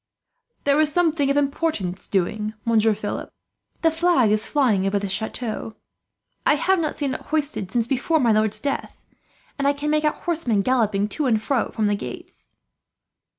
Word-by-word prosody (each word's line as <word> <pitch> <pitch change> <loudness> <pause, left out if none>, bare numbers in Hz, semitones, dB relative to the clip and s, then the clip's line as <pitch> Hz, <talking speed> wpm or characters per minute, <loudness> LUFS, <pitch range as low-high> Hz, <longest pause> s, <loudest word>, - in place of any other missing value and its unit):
"There 285 +1 +3
is 305 -1 +1
something 320 -4 +2
of 280 - +2
importance 275 - -1
doing, 210 +3 -1
Monsieur 220 -2 +3
Philip. 205 0 -5 0.5
The 325 - +5
flag 320 -9 +3
is 215 0 +1
flying 225 -10 +2
over 200 +1 +1
the 200 0 -2
chateau. 220 +3 -4 0.7
I - - +4
have 375 +5 +2
not 310 -2 -1
seen 280 -3 -2
it - - -5
hoisted 295 -10 -1 0.2
before 275 +5 +1
since 295 - +1
my 235 - +4
lord's 215 0 +2
death, 280 -1 -4 0.5
and 280 - +1
I 285 - +4
can 290 +1 -2
make 305 0 +2
out 300 - 0
horsemen 255 - 0
galloping 215 -5 +1
to 295 +5 -1
and 225 -3 +3
from 220 -2 -1
the 205 - +2
gates." 200 - -8
255 Hz, 170 wpm, -23 LUFS, 215-300 Hz, 0.7 s, The